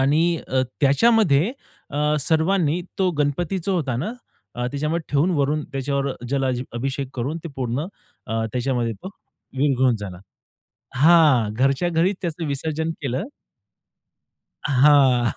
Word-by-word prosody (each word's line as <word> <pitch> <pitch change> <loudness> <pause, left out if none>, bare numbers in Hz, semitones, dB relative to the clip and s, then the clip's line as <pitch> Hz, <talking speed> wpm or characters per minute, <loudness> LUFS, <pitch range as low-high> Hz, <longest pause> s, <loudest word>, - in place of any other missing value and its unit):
आणि 160 +5 +3
अ, 130 0 +2 0.2
त्याच्यामध्ये 175 - +4 0.4
अ, 150 +1 +1
सर्वांनी 160 +2 +1 0.2
तो 185 -1 +2
गणपती 150 +6 0
जो 195 - +1
होता 145 -8 -1
ना 170 - -3 0.5
त्याच्यामध्ये 150 +5 -2
ठेवून 145 +6 +3
वरून 145 +2 +1
त्याच्यावर 140 0 -1 0.2
जलाजी 130 -2 0
अभिषेक 135 +3 -3
करून 135 +6 -3
ते 170 - -4
पूर्ण 130 +4 -2 0.4
अ, 110 +1 -1
त्याच्यामध्ये 125 -2 -1 0.7
विरघळून 130 -3 +2
झाला. 100 -4 -7 0.8
हां, 145 -7 +5
घरच्या 135 +8 +1
घरीच 175 +4 +1
त्याचं 170 -1 -3
विसर्जन 155 +3 -2
केलं. 135 +3 -2 1.4
हां. 135 -3 +4
140 Hz, 115 wpm, -22 LUFS, 130-160 Hz, 1.4 s, हां